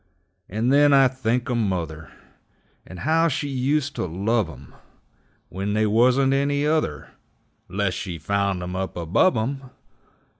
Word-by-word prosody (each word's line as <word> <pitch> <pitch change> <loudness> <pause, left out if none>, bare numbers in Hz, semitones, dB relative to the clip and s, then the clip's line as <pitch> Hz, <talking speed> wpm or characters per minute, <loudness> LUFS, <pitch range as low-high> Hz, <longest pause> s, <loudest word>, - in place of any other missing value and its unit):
And 115 +6 0
then 145 0 +5
I 135 -1 +6
think 125 -2 -2
o' 125 - -1
mother, 90 -8 -3 0.8
And 90 -1 -10
how 165 +3 +2
she 145 -1 -2
ust 140 +2 0
to - - -2
love 100 +3 0
'em 70 -3 -13 0.8
When 100 +3 -3
they 110 +1 +2
wuzn't 125 +5 +3
any 140 +1 +1
other, 150 - -1 0.6
'Less 100 0 -1
she 90 -5 -5
found 100 +2 -1
'em 90 +1 -5
up 95 -2 -4
above 90 - +2
'em! 130 +4 -3
110 Hz, 145 wpm, -23 LUFS, 95-135 Hz, 0.8 s, I